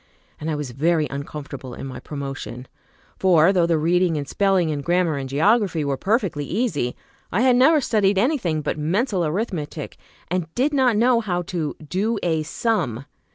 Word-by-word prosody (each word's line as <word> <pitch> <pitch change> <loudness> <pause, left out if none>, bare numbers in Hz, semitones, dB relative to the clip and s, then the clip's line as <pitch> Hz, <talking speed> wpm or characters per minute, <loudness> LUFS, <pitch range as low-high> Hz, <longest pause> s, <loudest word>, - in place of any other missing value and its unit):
And 155 - -4
I 155 - 0
was 145 -4 -4
very 155 +5 +1
uncomfortable 140 -2 -7
in - - -7
my 130 -2 -7
promotion, 135 -3 -6 0.5
for 180 -1 +5
though 175 -3 +3
the 165 -1 +2
reading 170 +1 +2
and 145 -1 -4
spelling 190 -2 +2
and 145 -2 -3
grammar 175 -1 +1
and 135 -1 -4
geography 170 - +2
were 140 -1 0
perfectly 195 - 0
easy, 160 - -1 0.4
I 205 - +1
had 255 -1 +5
never 290 +5 +5
studied 205 -5 +2
any 270 +9 +2
thing 160 -7 -1
but 150 +1 -3
mental 190 - 0
arithmetic, 160 -3 -3 0.3
and 175 -2 -2
did 275 +5 +1
not 255 -5 +3
know 240 +1 +4
how 180 -6 -2
to 170 -5 -3
"do 210 +7 0
a 160 -3 +1
sum." 155 - -1
170 Hz, 175 wpm, -22 LUFS, 150-210 Hz, 0.5 s, for